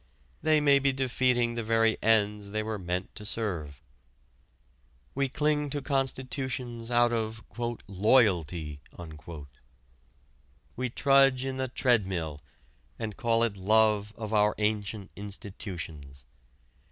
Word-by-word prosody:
They 155 Hz, -1 st, +4 dB
may 140 Hz, -2 st, +5 dB
be 140 Hz, 0 st, +2 dB
defeating 125 Hz, -2 st, +1 dB
the 115 Hz, -, -2 dB
very 115 Hz, 0 st, +3 dB
ends 105 Hz, -2 st, +2 dB
they 110 Hz, +1 st, -2 dB
were 110 Hz, -1 st, -3 dB
meant 90 Hz, +1 st, -3 dB
to 105 Hz, -, -7 dB
serve. 85 Hz, -, -2 dB, 1.3 s
We 140 Hz, 0 st, 0 dB
cling 150 Hz, +1 st, +1 dB
to 145 Hz, +1 st, -3 dB
constitutions 130 Hz, -3 st, -2 dB
out 120 Hz, 0 st, +3 dB
of 110 Hz, -1 st, -2 dB, 0.4 s
"loyalty." 90 Hz, -, +2 dB, 1.9 s
We 125 Hz, 0 st, -2 dB
trudge 135 Hz, 0 st, +4 dB
in 135 Hz, -1 st, -3 dB
the 130 Hz, 0 st, -1 dB
treadmill 95 Hz, -, 0 dB, 0.6 s
and 110 Hz, -3 st, -4 dB
call 115 Hz, -1 st, +2 dB
it 115 Hz, -3 st, 0 dB
love 105 Hz, +1 st, +3 dB
of 110 Hz, -1 st, -5 dB
our 105 Hz, 0 st, +3 dB
ancient 105 Hz, -1 st, -2 dB
institutions. 85 Hz, -, -7 dB
110 Hz, 115 wpm, -29 LUFS, 100-130 Hz, 1.9 s, may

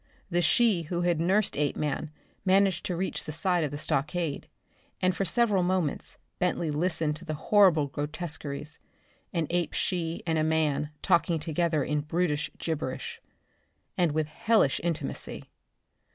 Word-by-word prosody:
The 175 Hz, +1 st, +2 dB
she 200 Hz, +2 st, +4 dB
who 175 Hz, -1 st, -1 dB
had 175 Hz, -2 st, +1 dB
nursed 190 Hz, +5 st, +2 dB
Apeman 150 Hz, +1 st, -1 dB, 0.3 s
managed 190 Hz, -2 st, +3 dB
to 180 Hz, -, -1 dB
reach 190 Hz, +3 st, -2 dB
the -, -, -4 dB
side 175 Hz, +2 st, +1 dB
of 150 Hz, -, 0 dB
the 145 Hz, -, -5 dB
stockade, 150 Hz, +1 st, -1 dB, 0.5 s
and 185 Hz, 0 st, +2 dB
for 195 Hz, -, 0 dB
several 210 Hz, -2 st, +2 dB
moments 180 Hz, -4 st, -1 dB, 0.2 s
Bentley 175 Hz, -3 st, 0 dB
listened 155 Hz, -1 st, 0 dB
to 170 Hz, -, -12 dB
the 155 Hz, -2 st, -3 dB
horrible 180 Hz, -3 st, +4 dB
grotesqueries 150 Hz, 0 st, -5 dB, 0.5 s
an 165 Hz, -3 st, 0 dB
ape 175 Hz, -2 st, 0 dB
she 170 Hz, -3 st, -2 dB
and 160 Hz, -2 st, +1 dB
a -, -, +2 dB
man 155 Hz, -2 st, +1 dB
talking 170 Hz, -2 st, +3 dB
together 160 Hz, -1 st, 0 dB
in 150 Hz, -1 st, 0 dB
brutish 150 Hz, 0 st, 0 dB
gibberish, 150 Hz, -5 st, -4 dB, 0.7 s
and 175 Hz, -3 st, +2 dB
with 155 Hz, 0 st, 0 dB
hellish 185 Hz, -1 st, +2 dB
intimacy. 165 Hz, -4 st, -3 dB
165 Hz, 145 wpm, -28 LUFS, 150-180 Hz, 0.7 s, she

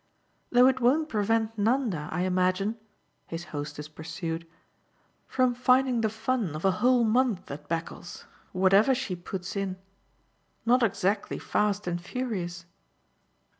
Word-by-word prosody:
"Though 245 Hz, +1 st, +6 dB
it 260 Hz, 0 st, +4 dB
won't 290 Hz, +6 st, +3 dB
prevent 220 Hz, 0 st, 0 dB
Nanda, 215 Hz, -, +1 dB
I 175 Hz, -, -1 dB
imagine," 185 Hz, +3 st, +1 dB, 0.5 s
his 165 Hz, +1 st, -5 dB
hostess 145 Hz, 0 st, -5 dB
pursued, 165 Hz, +1 st, -5 dB, 0.8 s
"from 255 Hz, -1 st, +2 dB
finding 250 Hz, 0 st, +3 dB
the 220 Hz, -, +2 dB
fun 220 Hz, -, -1 dB
of 155 Hz, -, -4 dB
a 190 Hz, -, +5 dB
whole 250 Hz, -1 st, +5 dB
month 225 Hz, -, +1 dB
at 150 Hz, +1 st, -8 dB
Beccles 165 Hz, +1 st, -5 dB, 0.3 s
or 185 Hz, -, -4 dB
whatever 200 Hz, +7 st, +5 dB
she 245 Hz, -8 st, -3 dB
puts 180 Hz, +2 st, -6 dB
in 195 Hz, -2 st, -2 dB, 0.9 s
not 250 Hz, +2 st, +4 dB
exactly 200 Hz, -2 st, 0 dB
fast 210 Hz, -1 st, 0 dB
and 175 Hz, -1 st, -2 dB
furious." 180 Hz, -6 st, -4 dB
200 Hz, 130 wpm, -28 LUFS, 175-245 Hz, 0.9 s, Though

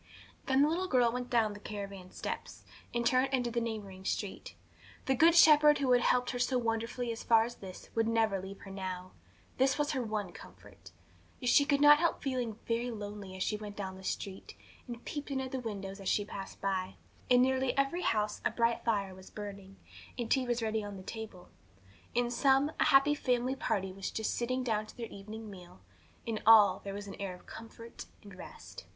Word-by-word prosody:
Then 270 Hz, +1 st, +4 dB
the -, -, +4 dB
little 350 Hz, +4 st, -1 dB
girl 245 Hz, -6 st, +3 dB
went 250 Hz, +1 st, -4 dB
down 225 Hz, -3 st, +2 dB
the 205 Hz, -, -10 dB
caravan 200 Hz, -3 st, -7 dB
steps, -, -, -6 dB, 0.3 s
and 235 Hz, 0 st, -1 dB
turned 255 Hz, +2 st, +3 dB
into 245 Hz, -3 st, 0 dB
the 235 Hz, 0 st, 0 dB
neighbouring 205 Hz, -5 st, -5 dB
street. 195 Hz, 0 st, -4 dB, 0.5 s
The 265 Hz, -, +2 dB
Good 325 Hz, +6 st, +5 dB
Shepherd 300 Hz, -2 st, +7 dB
who 270 Hz, -2 st, +1 dB
had 245 Hz, -1 st, +5 dB
helped 250 Hz, 0 st, +2 dB
her 245 Hz, -, -4 dB
so 250 Hz, +1 st, +1 dB
wonderfully 230 Hz, +1 st, -2 dB
as 225 Hz, -, -5 dB
far 225 Hz, -1 st, +5 dB
as 240 Hz, +1 st, -6 dB
this 185 Hz, -2 st, -10 dB
would 225 Hz, -1 st, +1 dB
never 220 Hz, -4 st, +1 dB
leave 195 Hz, +1 st, -9 dB
her 195 Hz, -, -10 dB
now. 185 Hz, -1 st, -5 dB, 0.5 s
This 265 Hz, +1 st, +3 dB
was 295 Hz, 0 st, 0 dB
her 265 Hz, -, -1 dB
one 215 Hz, -3 st, -3 dB
comfort. -, -, -14 dB, 0.5 s
Yet 250 Hz, -, 0 dB
she 285 Hz, -, +6 dB
could 280 Hz, 0 st, +2 dB
not 295 Hz, 0 st, +8 dB
help 340 Hz, 0 st, 0 dB
feeling 250 Hz, -5 st, -2 dB
very 235 Hz, +1 st, 0 dB
lonely 205 Hz, -3 st, -7 dB
as 185 Hz, -, -2 dB
she 210 Hz, -, -1 dB
went 210 Hz, -1 st, -8 dB
down 190 Hz, -2 st, -5 dB
the 190 Hz, -, -12 dB
street, 190 Hz, 0 st, -5 dB, 0.3 s
and 240 Hz, -1 st, -8 dB
peeped 290 Hz, -1 st, -5 dB
in 275 Hz, -1 st, -1 dB
at 260 Hz, -1 st, -4 dB
the 265 Hz, -, -2 dB
windows 200 Hz, -4 st, -6 dB
as 195 Hz, -, -3 dB
she 205 Hz, -, +1 dB
passed 195 Hz, -1 st, -8 dB
by. 190 Hz, -1 st, -2 dB, 0.3 s
In 250 Hz, 0 st, +6 dB
nearly 260 Hz, 0 st, +1 dB
every 275 Hz, +6 st, +1 dB
house 210 Hz, -5 st, 0 dB
a -, -, +2 dB
bright 235 Hz, 0 st, 0 dB
fire 200 Hz, -4 st, 0 dB
was 185 Hz, 0 st, -13 dB
burning, 200 Hz, -2 st, -8 dB, 0.4 s
and 240 Hz, -2 st, -3 dB
tea 260 Hz, -2 st, +2 dB
was 240 Hz, -1 st, 0 dB
ready 220 Hz, -1 st, -1 dB
on 205 Hz, -1 st, -7 dB
the 185 Hz, -, -10 dB
table; 220 Hz, -4 st, -8 dB, 0.7 s
in 240 Hz, 0 st, +1 dB
some, 270 Hz, +3 st, +3 dB
a -, -, +4 dB
happy 275 Hz, +2 st, +5 dB
family 255 Hz, -2 st, 0 dB
party 195 Hz, -9 st, -2 dB
was 195 Hz, 0 st, -4 dB
just 220 Hz, -, -2 dB
sitting 255 Hz, +2 st, -1 dB
down 215 Hz, -3 st, -1 dB
to -, -, -14 dB
their 230 Hz, -2 st, -5 dB
evening 215 Hz, +2 st, -9 dB
meal; 180 Hz, -, -13 dB, 0.5 s
in 225 Hz, -2 st, -2 dB
all, 210 Hz, -4 st, +8 dB
there 195 Hz, 0 st, -5 dB
was 205 Hz, 0 st, -6 dB
an 200 Hz, -, -8 dB
air 190 Hz, -2 st, -4 dB
of -, -, -18 dB
comfort 230 Hz, +1 st, -10 dB, 0.2 s
and 200 Hz, -1 st, -12 dB
rest. 185 Hz, -, -11 dB
225 Hz, 210 wpm, -32 LUFS, 200-255 Hz, 0.7 s, not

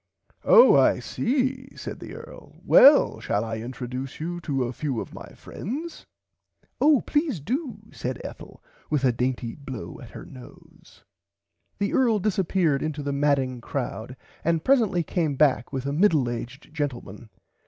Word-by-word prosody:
Oh 485 Hz, 0 st, +7 dB
I -, -, +5 dB
see 260 Hz, +1 st, -2 dB
said -, -, -7 dB
the -, -, -9 dB
earl -, -, -12 dB
well 285 Hz, +2 st, +7 dB
shall 105 Hz, +2 st, -1 dB
I 115 Hz, 0 st, -4 dB
introduce 125 Hz, +2 st, -6 dB
you 175 Hz, +2 st, -4 dB
to 135 Hz, -5 st, -1 dB
a 120 Hz, +1 st, -3 dB
few 135 Hz, -3 st, -3 dB
of -, -, -7 dB
my -, -, -9 dB
friends. 300 Hz, -, -7 dB, 0.7 s
Of 295 Hz, -3 st, +4 dB
please 295 Hz, -, 0 dB
do 245 Hz, -, -3 dB
said -, -, -5 dB
Ethel -, -, -10 dB, 0.3 s
with 140 Hz, -3 st, +1 dB
a 125 Hz, -, +4 dB
dainty 125 Hz, -1 st, -2 dB
blow 130 Hz, -, -8 dB
at -, -, -11 dB
her -, -, -10 dB
nose. -, -, -16 dB, 0.7 s
The 200 Hz, 0 st, -1 dB
earl 235 Hz, -4 st, +3 dB
disserppeard 185 Hz, -7 st, +1 dB
into 155 Hz, -1 st, -3 dB
the 140 Hz, 0 st, -2 dB
madding 140 Hz, -3 st, +1 dB
crowd 125 Hz, -1 st, -5 dB, 0.3 s
and 165 Hz, -1 st, +1 dB
presently 225 Hz, -10 st, +3 dB
came 160 Hz, -3 st, -1 dB
back 135 Hz, -4 st, +2 dB
with 135 Hz, -1 st, -4 dB
a 140 Hz, -, -2 dB
middle 155 Hz, -6 st, +3 dB
aged 125 Hz, +6 st, -8 dB
gentleman. 120 Hz, -7 st, -5 dB
145 Hz, 155 wpm, -25 LUFS, 130-205 Hz, 0.7 s, Oh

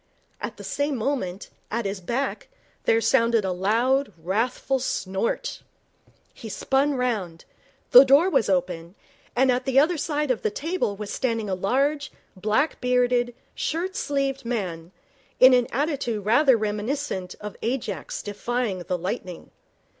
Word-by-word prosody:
At 215 Hz, -, -5 dB
the 205 Hz, -, -9 dB
same 285 Hz, +7 st, -1 dB
moment, 220 Hz, -7 st, -3 dB, 0.2 s
at 230 Hz, +1 st, -2 dB
his 195 Hz, -1 st, -3 dB
back, 270 Hz, -, -2 dB, 0.4 s
there 225 Hz, -, +3 dB
sounded 230 Hz, -4 st, +3 dB
a 190 Hz, -, 0 dB
loud, 230 Hz, +8 st, +1 dB
wrathful 225 Hz, +10 st, -1 dB
snort. 195 Hz, -4 st, -2 dB, 0.7 s
He 225 Hz, -, -9 dB
spun 275 Hz, +7 st, +1 dB
round. 210 Hz, -10 st, -2 dB, 0.5 s
The 250 Hz, -, +11 dB
door 280 Hz, +6 st, +5 dB
was 270 Hz, -, +2 dB
open, 180 Hz, -1 st, -1 dB, 0.4 s
and 260 Hz, +1 st, +4 dB
at 250 Hz, 0 st, -1 dB
the 265 Hz, 0 st, 0 dB
other 315 Hz, +5 st, +4 dB
side 300 Hz, -2 st, -1 dB
of 235 Hz, -, -1 dB
the -, -, +1 dB
table 300 Hz, -, -2 dB
was 205 Hz, 0 st, -6 dB
standing 230 Hz, -5 st, -1 dB
a -, -, +1 dB
large, 275 Hz, +10 st, 0 dB, 0.2 s
black 215 Hz, +10 st, 0 dB
bearded, 245 Hz, -1 st, +2 dB, 0.2 s
shirt 360 Hz, +4 st, -2 dB
sleeved 275 Hz, -2 st, -1 dB
man, 185 Hz, -8 st, -4 dB, 0.5 s
in 260 Hz, 0 st, +9 dB
an 245 Hz, -1 st, +4 dB
attitude 260 Hz, -7 st, -1 dB
rather 245 Hz, +3 st, +5 dB
reminiscent 210 Hz, -1 st, -3 dB
of 210 Hz, -1 st, -7 dB
Ajax 220 Hz, -, -3 dB
defying 210 Hz, 0 st, -2 dB
the 180 Hz, +1 st, -2 dB
lightning. 180 Hz, 0 st, -5 dB
235 Hz, 140 wpm, -25 LUFS, 200-270 Hz, 0.7 s, The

